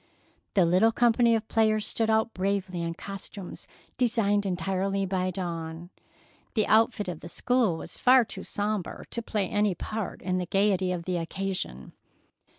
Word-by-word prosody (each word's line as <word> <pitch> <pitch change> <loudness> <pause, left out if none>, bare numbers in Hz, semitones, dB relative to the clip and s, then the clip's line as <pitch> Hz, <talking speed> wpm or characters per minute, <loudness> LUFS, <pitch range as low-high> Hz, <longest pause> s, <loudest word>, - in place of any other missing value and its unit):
The 190 -4 +5
little 185 +7 +4
company 235 0 +4
of 220 0 -2
players 215 -1 +2
stood 225 -1 -1
out 220 +1 +2
bravely 190 -2 -1
in 165 0 -3
costumes 195 0 -8 0.3
designed 205 -4 +2
entirely 195 +2 -1
by 185 -1 -1
Dawn. 170 -1 -5 0.6
The 215 - +3
outfit 220 -1 +3
of 175 -3 -4
the - - -9
school 240 -5 +1
was - - -5
far 255 -1 +6
too - - -6
sombre 205 -3 -3
to 235 - -3
play 210 -4 -1
any 205 -2 +1
part 215 +4 -5
in 185 0 0
the 180 - -3
gaiety 195 -1 +2
of 175 -2 -3
the 180 -1 -1
occasion. 170 - -4
195 Hz, 155 wpm, -27 LUFS, 180-220 Hz, 0.6 s, far